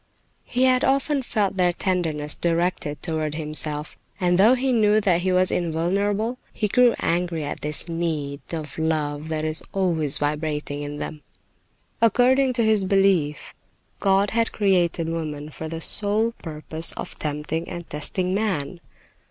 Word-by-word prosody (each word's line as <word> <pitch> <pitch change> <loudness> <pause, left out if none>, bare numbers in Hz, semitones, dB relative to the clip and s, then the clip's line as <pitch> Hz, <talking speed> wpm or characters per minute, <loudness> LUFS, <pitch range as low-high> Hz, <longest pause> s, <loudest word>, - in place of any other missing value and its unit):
He 250 +1 0
had 255 -1 +4
often 275 +1 +1
felt 205 -5 -1
their 180 -1 +3
tenderness 165 -5 0
directed 170 -3 -1
toward 155 -2 -2
himself, 150 -1 -3 0.2
and 180 -1 +2
though 225 +6 +6
he 260 0 0
knew 215 -2 +4
that 180 -4 +2
he 185 +1 0
was 185 0 +2
invulnerable, 200 +8 -1
he 210 - -1
grew 245 +3 +4
angry 170 -2 -1
at 145 - -5
this 150 +2 +1
need 155 -4 -3
of 155 -3 -6
love 155 -1 -1
that 155 -1 -2
is 155 0 0
always 165 -7 +1
vibrating 150 -1 -2
in 145 0 -5
them. 150 0 -6 0.8
According 255 +4 +4
to 235 -1 +1
his 215 -2 +3
belief, 190 -6 +1 0.5
God 195 0 +2
had 230 0 +4
created 180 -5 +1
woman 155 -2 -4
for 160 +1 -6
the 165 0 -5
sole 215 +6 +3
purpose 160 0 0
of - - -6
tempting 150 +2 -4
and 175 -1 -7
testing 180 +5 -2
man. 185 -6 -2
170 Hz, 150 wpm, -23 LUFS, 155-205 Hz, 0.8 s, though